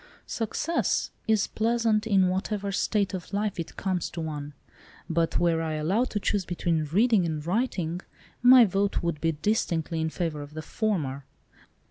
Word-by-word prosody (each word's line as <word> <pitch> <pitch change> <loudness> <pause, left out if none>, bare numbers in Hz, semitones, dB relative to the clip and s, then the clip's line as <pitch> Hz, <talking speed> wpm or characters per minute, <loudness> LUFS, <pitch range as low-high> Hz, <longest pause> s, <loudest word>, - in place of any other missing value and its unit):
"Success 295 +9 -1 0.2
is 220 -2 +3
pleasant 225 -1 +1
in 195 -3 +4
whatever 200 +2 -2
state 200 0 0
of 185 -1 -6
life 205 -2 -1
it 165 - -6
comes 185 -3 -1
to - - -7
one, 150 -2 -5 0.5
but 165 0 0
were 170 -2 +2
I 160 -1 -2
allowed 190 +12 +1
to 210 - -2
choose 205 -1 0
between 170 -2 -1
reading 205 +6 +3
and 155 -3 -3
writing, 180 -4 -1 0.4
my 250 0 +9
vote 200 0 0
would 170 -3 -2
be 165 -1 +1
distinctly 165 -2 -1
in 160 - 0
favour 160 -3 -3
of 145 +1 -10
the 155 - -5
former. 150 -10 -2
180 Hz, 160 wpm, -27 LUFS, 160-215 Hz, 0.5 s, my